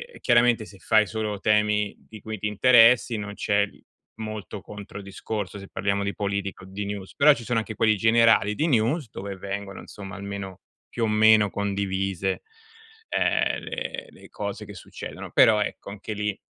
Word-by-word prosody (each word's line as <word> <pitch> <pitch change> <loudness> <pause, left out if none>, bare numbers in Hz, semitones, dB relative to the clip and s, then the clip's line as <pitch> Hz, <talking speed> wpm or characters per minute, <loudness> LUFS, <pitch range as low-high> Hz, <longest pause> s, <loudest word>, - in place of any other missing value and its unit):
e - - -10
chiaramente 120 -2 +4
se 100 -2 -15
fai 110 -1 +4
solo 105 -1 -3
temi 105 0 +2
di 110 -1 -13
cui 110 +1 -6
ti 105 - -1
interessi 120 +1 +5
non 100 -1 -5
c'è, 100 0 +2
uhm, 100 - -7 0.4
molto 110 -2 -6
contro-discorso 100 0 -6
se 95 - -10
parliamo 100 0 -1
di 100 0 -2
politica 100 -2 -3
o 95 - -12
di 100 +1 -5
news. 100 -2 -6
Però 150 +1 +7
ci 115 - -8
sono 115 0 0
anche 110 0 -5
quelli 110 -1 +3
generali 115 -1 +4
di 160 - +1
news, 125 +1 +1
dove 100 0 -6
vengono 100 +1 -6
insomma 100 -2 -9
almeno, 100 -1 -6 0.3
più 120 - -3
o - - 0
meno 110 -1 +5
condivise, 95 -1 -2 0.7
ehm, - - +1
le - - -5
le - - -16
cose - - -5
che - - -10
succedono. - - -9
Però 105 -2 +5
ecco 105 - -4
anche 105 +2 -6
lì, 105 -1 -3
105 Hz, 175 wpm, -25 LUFS, 100-110 Hz, 0.7 s, Però